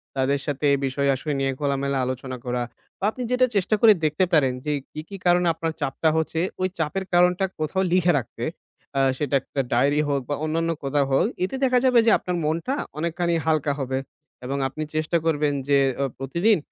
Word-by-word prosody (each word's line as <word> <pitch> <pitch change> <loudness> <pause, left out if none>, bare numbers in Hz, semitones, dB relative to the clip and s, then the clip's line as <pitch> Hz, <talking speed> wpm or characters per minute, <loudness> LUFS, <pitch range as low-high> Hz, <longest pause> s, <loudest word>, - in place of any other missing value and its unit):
তাদের 135 +1 +1
সাথে 145 0 -2
এ - - +5
বিষয়-আসয় 140 +2 0
নিয়ে 135 0 +1
খোলামেলা 140 -1 0
আলোচনা 130 0 -4
করা 125 0 -1 0.4
বা 195 - -1
আপনি 250 - -6
যেটা 250 0 +4
চেষ্টা 200 +2 +2
করে 225 -2 +8
দেখতে 155 +5 +2
পারেন 135 -5 +4
যে 150 - 0 0.2
কি, 155 - -6
কি, 200 - -7
কারণে 175 0 +4
আপনার 165 0 -3
চাপটা 160 +4 +1
হচ্ছে 160 0 -1 0.2
ওই 185 - +3
চাপের 170 +4 -2
কারণটা 180 +2 +4
কোথাও 170 +5 0
লিখে 180 -1 +4
রাখতে। 120 -2 -5 0.5
আ - - +4 0.2
সেটা 145 -1 -1
একটা 135 - -3
ডায়েরি 140 +5 +3
হোক 140 -1 +1
বা 145 - 0
অন্যান্য 165 +1 0
কোথাও 140 +1 +1
হোক। 135 - +3 0.2
এতে 190 - -2
দেখা 255 -1 +4
যাবে 250 -2 +5
যে 230 - +5
আপনার 180 -1 -3
মনটা 165 - -1 0.2
অনেকখানি 170 +1 -1
হালকা 155 -2 +1
হবে 130 0 -1 0.5
এবং 140 +2 -2
আপনি 155 +4 -5
চেষ্টা 155 +2 +1
করবেন 150 -2 +1
যে 140 -1 +4 0.2
অ - - +2
প্রতিদিন 170 - +2
155 Hz, 190 wpm, -24 LUFS, 140-175 Hz, 0.5 s, করে